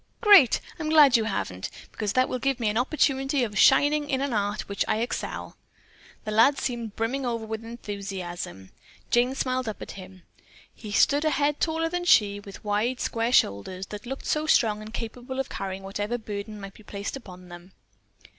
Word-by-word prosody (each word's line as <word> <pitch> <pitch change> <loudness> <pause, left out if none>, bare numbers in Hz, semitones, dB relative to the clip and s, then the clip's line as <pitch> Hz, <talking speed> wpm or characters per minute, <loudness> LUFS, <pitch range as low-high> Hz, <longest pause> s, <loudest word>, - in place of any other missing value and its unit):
"Great! 400 - +7 0.2
I'm 310 -1 -2
glad 295 -4 +7
you 225 -2 +3
haven't, 95 - -3 0.2
because 210 -2 -3
that 255 0 +3
will 255 - -3
give 270 0 0
me 225 -3 +1
an 210 - -1
opportunity 270 0 +1
of 210 -3 -4
shining 290 +5 +4
in 265 -2 +1
an 275 -2 -1
art 205 0 -1
at - - -13
which 200 0 -1
I - - +1
excel." 235 +2 -4 0.7
The 215 - -3
lad 230 +7 +5
seemed 235 -4 -4
brimming 245 +5 -1
over 230 -3 -2
with 220 0 -5
enthusiasm. 195 - -6 0.4
Jane 245 +2 +3
smiled 255 -3 -1
up 215 - -6
at - - -7
him. 185 -1 -12 0.5
He 215 - -9
stood 285 +8 +3
a 310 - +3
head 295 -1 +1
taller 325 0 0
than 350 +1 -3
she, 205 -10 +4
with 200 -1 -12
wide, 215 +5 0
square 230 +1 -1
shoulders 185 - +1
that 210 +3 -7
looked 270 +2 -6
so 305 0 0
strong 215 -8 +3
and 215 +1 -9
capable 245 +3 -6
of 270 - -2
carrying 195 0 -5
whatever 205 +4 -3
burden 210 -1 -6
might 195 -1 -9
be - - -16
placed 200 +1 -6
upon 185 -8 -11
them. 175 +2 -12
225 Hz, 195 wpm, -26 LUFS, 205-270 Hz, 0.7 s, Great